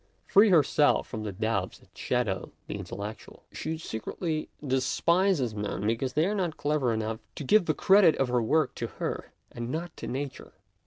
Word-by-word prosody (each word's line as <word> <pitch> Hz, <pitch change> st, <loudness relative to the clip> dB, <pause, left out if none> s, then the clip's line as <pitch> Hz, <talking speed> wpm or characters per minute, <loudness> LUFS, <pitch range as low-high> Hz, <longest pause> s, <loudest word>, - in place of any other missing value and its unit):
Free 205 Hz, +2 st, +6 dB
herself 150 Hz, -4 st, +4 dB
from 110 Hz, -, -5 dB
the 105 Hz, -1 st, -4 dB
doubts 100 Hz, -1 st, -2 dB
that -, -, -25 dB
shadow 115 Hz, -7 st, -1 dB
the -, -, -5 dB
intellectual, 105 Hz, +2 st, -8 dB
she 160 Hz, +1 st, -4 dB
secretly 155 Hz, -, -4 dB, 0.2 s
despises 140 Hz, -, +2 dB
men 105 Hz, -2 st, -3 dB
because 115 Hz, +4 st, 0 dB
they 155 Hz, +4 st, +3 dB
are 200 Hz, -, 0 dB
not 175 Hz, -6 st, -1 dB
clever 145 Hz, -4 st, +1 dB
enough 110 Hz, 0 st, -2 dB, 0.2 s
to -, -, -5 dB
give 200 Hz, +7 st, +4 dB
the 155 Hz, -, +1 dB
credit 190 Hz, -4 st, +6 dB
of 135 Hz, -, 0 dB
her 125 Hz, -1 st, +2 dB
work 150 Hz, +5 st, +2 dB
to -, -, -1 dB
her, -, -, -4 dB, 0.2 s
and 120 Hz, 0 st, -5 dB
not 165 Hz, +4 st, -4 dB
to -, -, -6 dB
Nature. 135 Hz, +1 st, -5 dB
135 Hz, 175 wpm, -28 LUFS, 110-160 Hz, 0.2 s, Free